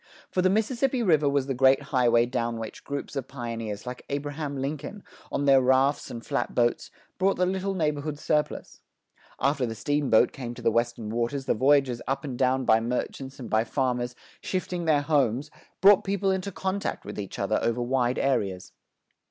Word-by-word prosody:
For 185 - +1
the 185 - +3
Mississippi 240 +5 +1
River 155 -7 +3
was 140 -1 +1
the 135 - -2
great 135 +2 +4
highway 120 -2 +4
down 120 -1 -2
which 110 -1 -7
groups 140 0 -5
of 135 -2 -3
pioneers 115 -5 -5
like 125 0 -7
Abraham 145 0 -3
Lincoln, 145 +8 -5 0.3
on 140 - -1
their 135 -1 +6
rafts 130 +2 +2
and 115 -1 -7
flat - - -2
boats, 120 -1 +1 0.3
brought 195 +1 +3
the 180 - +2
little 190 +1 -1
neighborhood 150 -3 -1
surplus. 150 0 -2 0.6
After 140 -2 +1
the 115 - -5
steamboat 135 -2 +2
came 120 -3 -6
to 120 - -10
the 115 - +3
western 115 -1 -1
waters 120 +4 -2
the - - +2
voyages 130 -1 +3
up 135 +1 -1
and 135 -4 -4
down 130 +1 +1
by 110 -1 +5
merchants 125 +3 -4
and 120 - -6
by 110 0 +2
farmers 125 -1 -1 0.3
shifting 180 -2 -3
their 150 -3 +3
homes, 140 -2 +1 0.3
brought 200 +1 +7
people 195 0 0
into 190 +1 -2
contact 190 +2 -3
with 105 +1 -6
each 100 -2 -6
other 105 +2 0
over 115 +1 0
wide 125 0 0
areas. 100 -9 -1
135 Hz, 180 wpm, -26 LUFS, 120-150 Hz, 0.6 s, brought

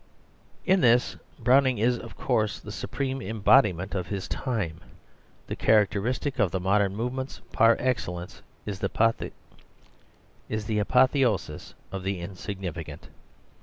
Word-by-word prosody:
In 190 0 +4
this 120 -2 +4 0.2
Browning 130 +1 +4
is, 120 +3 +2
of - - -11
course, 110 -5 0
the - - -9
supreme 135 -1 -3
embodiment 105 -3 +3
of 90 -3 -2
his 100 -2 -4
time. 95 - -3 0.6
The - - -5
characteristic 110 +6 +1
of 105 -4 +3
the 95 - -2
modern 100 +1 +2
movements 125 +4 -4
par 115 +1 +5
excellence 90 -9 -3 0.2
is 100 -2 -4
the - - -1 1.9
apotheosis 125 - +1 0.2
of 95 - -4
the 95 0 -2
insignificant. 85 -4 -6
105 Hz, 115 wpm, -27 LUFS, 95-125 Hz, 1.9 s, par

